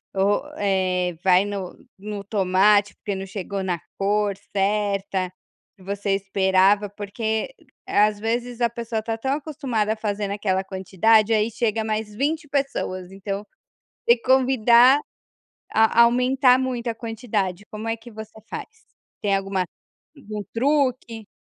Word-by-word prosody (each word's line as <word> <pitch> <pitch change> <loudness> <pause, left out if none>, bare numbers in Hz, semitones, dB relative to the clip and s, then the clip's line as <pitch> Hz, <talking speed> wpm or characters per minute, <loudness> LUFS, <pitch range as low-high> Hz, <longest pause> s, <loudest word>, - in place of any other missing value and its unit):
ou, 200 +5 +2 0.2
eh, 185 -3 0
vai 185 0 +5
no 195 -3 -5 0.2
no 205 0 -6
tomate, 200 +1 +3
porque, 205 - -4
não 190 0 -5
chegou 195 0 -4
na 180 -2 -1 0.2
cor 205 +1 +1 0.2
certa, 195 -2 0 0.5
você 200 +1 -2
esperava. 195 +1 +2
Porque, 220 - -3 0.3
às 210 0 +3
vezes 240 +2 -2
a 235 - +2
pessoa 230 -2 -4
tá 225 0 -2
tão 265 +4 0
acostumada 275 -8 -1
a - - -7
fazer 210 -1 -2
naquela 195 -2 -1
quantidade, 205 +4 +2
aí 215 +1 +2
chega 225 -1 0
mais 215 -1 -3
20 300 +6 -1
pessoas, 270 -10 -2
então, 195 +1 -5 0.6
você 235 - +7
convidar 255 0 +5 0.7
a 220 +1 +5
aumentar 250 +2 +4
muito 255 -2 -2
a 230 - -1
quantidade, 215 -5 -3
como 215 +1 -6
é 225 - 0
que 230 +2 -14
você 220 0 -10
faz? - - -5 0.5
Tem 200 -1 +2
alguma 195 -1 -1 0.5
algum 215 -6 -6
truque? 255 -4 0
210 Hz, 135 wpm, -23 LUFS, 195-235 Hz, 0.7 s, você